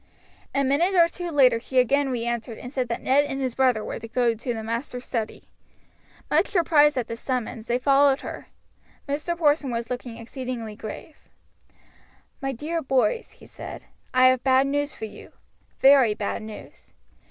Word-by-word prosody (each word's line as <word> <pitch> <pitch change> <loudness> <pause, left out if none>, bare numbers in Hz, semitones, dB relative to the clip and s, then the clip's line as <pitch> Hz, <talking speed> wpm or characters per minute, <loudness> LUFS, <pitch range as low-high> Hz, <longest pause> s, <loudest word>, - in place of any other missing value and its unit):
A 275 - +2
minute 315 +8 +2
or 340 -2 +6
two 350 0 -6
later 260 -7 +4
she 260 +2 -5
again 270 +3 +3
re 240 -2 -2
entered 235 -1 -3
and 250 +2 -9
said 255 -3 -1
that 235 - -4
Ned 275 +2 +4
and 270 -1 -4
his 260 -3 -1
brother 250 -5 +2
were - - -5
to 230 - -8
go 240 0 +1
to 235 +2 -4
the 220 - -5
master's 240 +3 -4
study. 225 -3 -4 0.8
Much - - +2
surprised 300 -5 +4
at 250 - 0
this 230 0 -6
summons 240 -3 -3
they 240 - +1
followed 275 +1 +4
her. - - -8 0.6
Mr. 305 +5 -2
Porson 295 -3 +2
was 235 0 -4
looking 245 -2 -5
exceedingly 235 -2 -6
grave. 220 +9 -10 1.1
"My 270 0 -1
dear 310 +6 -3
boys," 270 - +1
he - - -17
said, - - -9 0.3
"I 255 0 +5
have 255 -1 +1
bad 265 0 +4
news 290 +1 -1
for 220 - -7
you. 210 -1 -12 0.5
Very 265 -6 +6
bad 205 +1 -3
news. 215 -1 -11
255 Hz, 175 wpm, -25 LUFS, 235-285 Hz, 1.1 s, or